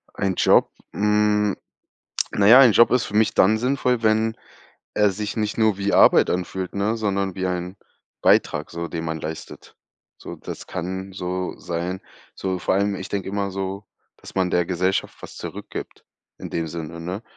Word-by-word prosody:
Ein 95 Hz, -2 st, -1 dB
Job? -, -, +4 dB, 0.2 s
Hm, 105 Hz, -1 st, +2 dB, 0.8 s
na 100 Hz, -, +2 dB
ja, 125 Hz, +5 st, +9 dB
ein 125 Hz, -4 st, +7 dB
Job 120 Hz, +3 st, +6 dB
ist 125 Hz, -1 st, +2 dB
für -, -, -8 dB
mich 110 Hz, 0 st, +3 dB
dann 110 Hz, +4 st, +4 dB
sinnvoll, 125 Hz, -1 st, 0 dB
wenn 110 Hz, +1 st, +2 dB, 0.6 s
er 105 Hz, -1 st, +3 dB
sich 105 Hz, +2 st, -4 dB
nicht 105 Hz, -1 st, -1 dB
nur 110 Hz, -3 st, +2 dB
wie 100 Hz, 0 st, -1 dB
Arbeit -, -, +6 dB
anfühlt, 90 Hz, +1 st, -3 dB
ne? 105 Hz, +3 st, 0 dB
Sondern 100 Hz, -3 st, -1 dB
wie 95 Hz, -1 st, -2 dB
ein 90 Hz, +1 st, -4 dB, 0.4 s
Beitrag -, -, +2 dB
so, 85 Hz, 0 st, -4 dB
den 85 Hz, 0 st, -5 dB
man 80 Hz, 0 st, -3 dB
leistet. 80 Hz, +1 st, -8 dB, 0.4 s
So, -, -, -9 dB
das -, -, -9 dB
kann 95 Hz, +2 st, -5 dB
so 90 Hz, 0 st, -3 dB
sein 90 Hz, +2 st, -4 dB, 0.3 s
so, 95 Hz, -1 st, -3 dB
vor -, -, 0 dB
allem, 100 Hz, +1 st, +1 dB
ich 95 Hz, 0 st, -6 dB
denke 100 Hz, -2 st, -3 dB
immer 100 Hz, -1 st, -2 dB
so: 95 Hz, +1 st, -4 dB, 0.3 s
„dass -, -, -13 dB
man 95 Hz, -1 st, +1 dB
der 90 Hz, -1 st, +1 dB
Gesellschaft 90 Hz, +1 st, -1 dB
was -, -, -10 dB
zurückgibt,“ -, -, -8 dB, 0.3 s
in -, -, -8 dB
dem 80 Hz, -1 st, -2 dB
Sinne, 85 Hz, 0 st, -7 dB
ne, 90 Hz, +6 st, -5 dB
95 Hz, 175 wpm, -23 LUFS, 90-105 Hz, 0.8 s, ja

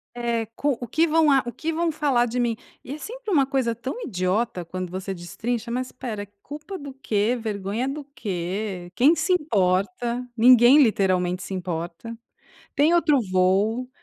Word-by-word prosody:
Eh, 235 Hz, -2 st, -1 dB
co 290 Hz, 0 st, +1 dB
o 240 Hz, -, -4 dB
que 325 Hz, +8 st, +2 dB
vão 315 Hz, -1 st, +4 dB
a 270 Hz, -, +5 dB
o 240 Hz, -, -4 dB
que 325 Hz, +1 st, -3 dB
vão 335 Hz, +1 st, 0 dB
falar 285 Hz, -6 st, +2 dB
de 245 Hz, +1 st, -4 dB
mim? 235 Hz, -2 st, 0 dB, 0.3 s
E 270 Hz, -, -7 dB
é -, -, -6 dB
sempre 465 Hz, +4 st, -7 dB
uma 280 Hz, -6 st, +4 dB
coisa 260 Hz, -4 st, 0 dB
tão 260 Hz, -, -6 dB
idiota 185 Hz, -, -1 dB
quando 185 Hz, +1 st, -5 dB
você 190 Hz, +1 st, -4 dB
destrincha, 220 Hz, +7 st, -4 dB
mas 255 Hz, +1 st, -2 dB
espera, 215 Hz, -5 st, -6 dB, 0.2 s
culpa 300 Hz, +7 st, -7 dB
do 280 Hz, -5 st, -9 dB
quê? 230 Hz, -2 st, 0 dB
Vergonha 215 Hz, +3 st, -2 dB
do 290 Hz, +2 st, -4 dB
quê? 185 Hz, -2 st, -4 dB
Quem 285 Hz, -, +5 dB
se 325 Hz, +4 st, -1 dB
importa? 235 Hz, -, 0 dB
Ninguém 245 Hz, +4 st, +7 dB
literalmente 185 Hz, -4 st, +1 dB
se -, -, -6 dB
importa. 175 Hz, +4 st, -5 dB, 0.6 s
Tem 300 Hz, +5 st, +4 dB
outro 320 Hz, -4 st, +4 dB
voo, 200 Hz, +7 st, +2 dB
240 Hz, 170 wpm, -24 LUFS, 195-280 Hz, 0.6 s, Ninguém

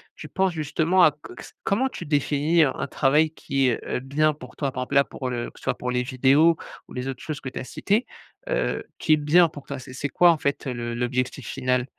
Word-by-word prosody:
tu -, -, -9 dB
penses 190 Hz, -1 st, +1 dB
justement 160 Hz, +3 st, +1 dB
à 175 Hz, -, +8 dB
co 145 Hz, -3 st, -13 dB
s -, -, -11 dB
comment 255 Hz, +7 st, +1 dB
tu -, -, -8 dB
définis 150 Hz, +3 st, +2 dB
un 135 Hz, -, +1 dB
un -, -, -3 dB
travail 150 Hz, +4 st, +2 dB
qui, 135 Hz, -4 st, 0 dB
heu, 115 Hz, -, -2 dB
est -, -, -2 dB
bien, 150 Hz, +4 st, +1 dB
pour 125 Hz, -4 st, -12 dB
toi, 140 Hz, -3 st, -2 dB
par 130 Hz, 0 st, -3 dB
exemple, 125 Hz, -, -5 dB
là, 140 Hz, -, +7 dB
pour 130 Hz, -2 st, -6 dB
le 120 Hz, -1 st, -3 dB
que -, -, -18 dB
soit -, -, -1 dB
pour 125 Hz, -, -4 dB
les 125 Hz, 0 st, 0 dB
vidéos 140 Hz, +6 st, +4 dB, 0.3 s
ou -, -, -13 dB
les 125 Hz, +1 st, -4 dB
autres 135 Hz, -2 st, -5 dB
choses 155 Hz, -2 st, -4 dB
que 130 Hz, -, -5 dB
tu -, -, -6 dB
as -, -, -5 dB
citées, 205 Hz, -, 0 dB, 0.4 s
heu, -, -, -1 dB
qui 155 Hz, -, +3 dB
est 155 Hz, -, +5 dB
bien 160 Hz, +4 st, +5 dB
pour 145 Hz, -3 st, -11 dB
toi, 140 Hz, -, -5 dB
c'est 130 Hz, 0 st, -11 dB
c'est 145 Hz, +2 st, -3 dB
quoi, 175 Hz, +3 st, +5 dB
en 160 Hz, -, +1 dB
fait, 140 Hz, 0 st, -1 dB
le 130 Hz, -, -2 dB
le 120 Hz, 0 st, -4 dB
l'objectif 125 Hz, 0 st, -2 dB
final? 125 Hz, -2 st, 0 dB
140 Hz, 255 wpm, -24 LUFS, 130-155 Hz, 0.4 s, à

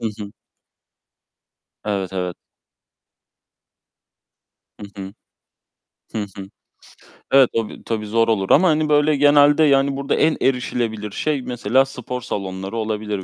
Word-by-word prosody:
Hı -, -, -6 dB
hı. 100 Hz, -1 st, -7 dB, 1.5 s
Evet, 100 Hz, -3 st, -3 dB
evet. 90 Hz, -2 st, -3 dB, 2.4 s
Hı 100 Hz, -1 st, -9 dB
hı. 95 Hz, -, -8 dB, 1.0 s
Hı -, -, -5 dB, 0.2 s
hı. 95 Hz, -1 st, -7 dB, 0.8 s
Evet, 135 Hz, -2 st, +6 dB
o 115 Hz, -2 st, -1 dB
bir, -, -, -12 dB
tabii, 110 Hz, -2 st, -3 dB
zor 115 Hz, +2 st, +1 dB
olur 100 Hz, -4 st, 0 dB
ama, 185 Hz, +5 st, +5 dB
hani, 155 Hz, -1 st, +1 dB
böyle, 150 Hz, 0 st, +3 dB
genelde, 145 Hz, +2 st, +5 dB
yani, 140 Hz, -1 st, +3 dB
burada 140 Hz, 0 st, -1 dB
en 160 Hz, 0 st, +2 dB
erişilebilir 120 Hz, -5 st, -1 dB
şey 145 Hz, +4 st, -2 dB
mesela 125 Hz, +2 st, +1 dB
spor 125 Hz, -1 st, -6 dB
salonları 95 Hz, 0 st, -5 dB
olabilir, 105 Hz, -2 st, -3 dB
115 Hz, 120 wpm, -20 LUFS, 105-140 Hz, 2.4 s, Evet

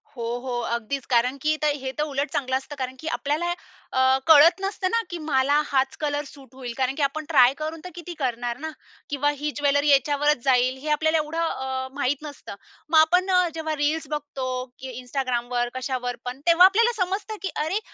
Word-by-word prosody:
हो, 235 Hz, -, -5 dB, 0.2 s
हो. 245 Hz, -1 st, -3 dB, 0.2 s
अगदीच 250 Hz, +4 st, -5 dB
कारण 250 Hz, +2 st, +2 dB
की 310 Hz, 0 st, +2 dB
तर 295 Hz, -1 st, +2 dB
हे 260 Hz, 0 st, -3 dB
तर 300 Hz, -, +1 dB
उलट 285 Hz, -1 st, -2 dB
चांगलं 260 Hz, -3 st, -1 dB
असतं. 280 Hz, +2 st, -8 dB
कारण 260 Hz, -1 st, -4 dB
की 320 Hz, -, -7 dB
आपल्याला 320 Hz, +3 st, -1 dB, 0.4 s
अ, 260 Hz, -, +1 dB, 0.3 s
कळत 325 Hz, +4 st, +7 dB
नसतं 385 Hz, -1 st, -1 dB
ना, 460 Hz, 0 st, +2 dB
की 350 Hz, -, -4 dB
मला 285 Hz, +1 st, +3 dB
हाच 270 Hz, -1 st, 0 dB
कलर 295 Hz, -1 st, -1 dB
सूट 265 Hz, -3 st, -16 dB
होईल. 245 Hz, -3 st, -6 dB
कारण 265 Hz, +1 st, 0 dB
की 300 Hz, -, -4 dB
आपण 300 Hz, +2 st, -1 dB
ट्राय 260 Hz, -4 st, +6 dB
करून 310 Hz, +1 st, -4 dB
तर 365 Hz, -, -7 dB
किती 345 Hz, 0 st, -7 dB
करणार 240 Hz, -2 st, -2 dB
ना? 315 Hz, +1 st, -4 dB, 0.4 s
किंवा 290 Hz, 0 st, +1 dB
ही 295 Hz, +1 st, -2 dB
ज्वेलरी 285 Hz, 0 st, +2 dB
याच्यावरच 290 Hz, +1 st, +3 dB
जाईल. 255 Hz, -1 st, +3 dB
हे 300 Hz, +3 st, -6 dB
आपल्याला 315 Hz, +2 st, +2 dB
एवढं 310 Hz, +2 st, -2 dB
अ, 265 Hz, -5 st, -2 dB
माहीत 280 Hz, 0 st, 0 dB
नसतं. 285 Hz, -8 st, -8 dB, 0.3 s
मग 325 Hz, -, +4 dB
आपण 360 Hz, +4 st, +4 dB
अ, 360 Hz, -1 st, +4 dB
जेव्हा 315 Hz, -1 st, -2 dB
रील्स 300 Hz, +2 st, 0 dB
बघतो 285 Hz, -3 st, -4 dB, 0.3 s
की 260 Hz, 0 st, -7 dB
Instagramवर, 245 Hz, -2 st, -1 dB
कशावर 250 Hz, -1 st, -3 dB
पण. 250 Hz, +2 st, -5 dB
तेव्हा 340 Hz, +2 st, +8 dB
आपल्याला 460 Hz, +5 st, +4 dB
समजतं 405 Hz, +4 st, -4 dB
की 380 Hz, -, -2 dB
अरे 370 Hz, +7 st, -1 dB
290 Hz, 195 wpm, -24 LUFS, 260-315 Hz, 0.4 s, तेव्हा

